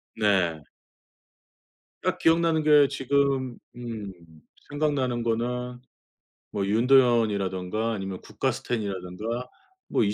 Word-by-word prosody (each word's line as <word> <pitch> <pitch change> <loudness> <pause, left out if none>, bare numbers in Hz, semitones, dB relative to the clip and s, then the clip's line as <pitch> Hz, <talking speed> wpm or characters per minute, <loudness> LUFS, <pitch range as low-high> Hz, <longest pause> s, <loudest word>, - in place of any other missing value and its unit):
네. 95 -8 +1 1.4
딱 - - 0
기억나는 165 -1 +3
게 150 -2 +6
지금 135 -2 0 0.2
음 115 -5 -6 0.6
생각나는 145 -5 0
거는 125 +2 -2 0.7
뭐 100 -1 -1
윤도현이라든가 110 -3 +2
아니면 95 -3 -5
국가스텐이라든가 105 +2 -3 0.4
뭐 - - +2
이 105 0 +1
115 Hz, 220 characters per minute, -26 LUFS, 100-130 Hz, 1.4 s, 게